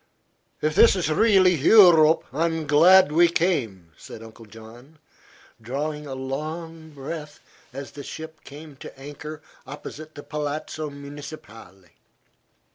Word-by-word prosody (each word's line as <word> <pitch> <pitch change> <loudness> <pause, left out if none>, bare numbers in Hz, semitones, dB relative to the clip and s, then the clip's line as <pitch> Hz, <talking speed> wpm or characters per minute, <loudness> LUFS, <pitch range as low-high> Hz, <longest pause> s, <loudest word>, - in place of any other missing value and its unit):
"If 155 0 +1
this 230 - +5
is 170 -4 -1
really 190 0 +4
Eu 180 +5 +7
rope, 160 0 +3
I'm 160 +1 -1
glad 165 +3 +5
we 170 +3 +5
came," 125 - -2
said 110 - -11
Uncle 115 0 -14
John, 115 +7 -15 0.6
drawing 150 +5 -5
a 135 - -6
long 160 +5 -6
breath 150 +1 -8 0.3
as 135 +2 -8
the 145 - -10
ship 160 +2 -10
came 150 +1 -12
to - - -12
anchor 145 +2 -9 0.2
opposite 155 +2 -10
the 145 - -10
Palazzo 150 +1 -5
Municipale. 140 - -12
150 Hz, 125 wpm, -23 LUFS, 135-160 Hz, 0.6 s, Eu